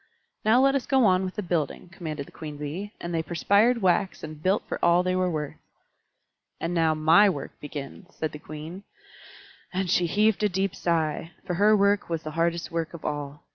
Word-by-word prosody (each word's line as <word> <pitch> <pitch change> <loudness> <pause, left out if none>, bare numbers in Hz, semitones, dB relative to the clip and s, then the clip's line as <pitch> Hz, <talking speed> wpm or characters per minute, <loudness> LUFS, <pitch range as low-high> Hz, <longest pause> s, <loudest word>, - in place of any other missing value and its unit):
"Now 220 +3 +5
let 275 +1 +4
us 275 -2 -1
go 265 -3 +4
on 185 -1 +4
with 185 0 -4
the 210 - -3
building," 170 -4 -2
commanded 155 -5 -6
the - - -16
Queen 150 -2 -8
Bee, 160 +8 -5
and 170 0 -5
they 165 - +1
perspired 205 +7 +2
wax 185 +1 +1
and 155 -1 -8
built 190 +5 +1
for - - -5
all 170 +1 +5
they 185 0 0
were 185 0 +1
worth. 150 -3 -4 1.0
"And 170 +1 -2
now 165 -2 +2
my 165 +7 +6
work 145 -7 -4
begins," 145 +5 -8
said 155 -2 -3
the 150 - -9
Queen, 155 +5 -8 0.9
and 185 -1 -1
she 175 - +3
heaved 210 +4 +2
a 210 - +3
deep 190 0 -1
sigh; 165 -1 -1
for 180 - -2
her 210 +4 +4
work 200 -1 +2
was 165 -1 -2
the 155 - -5
hardest 170 +1 -1
work 165 0 -3
of 165 - -10
all. 145 0 -4
170 Hz, 205 wpm, -26 LUFS, 155-195 Hz, 1.0 s, my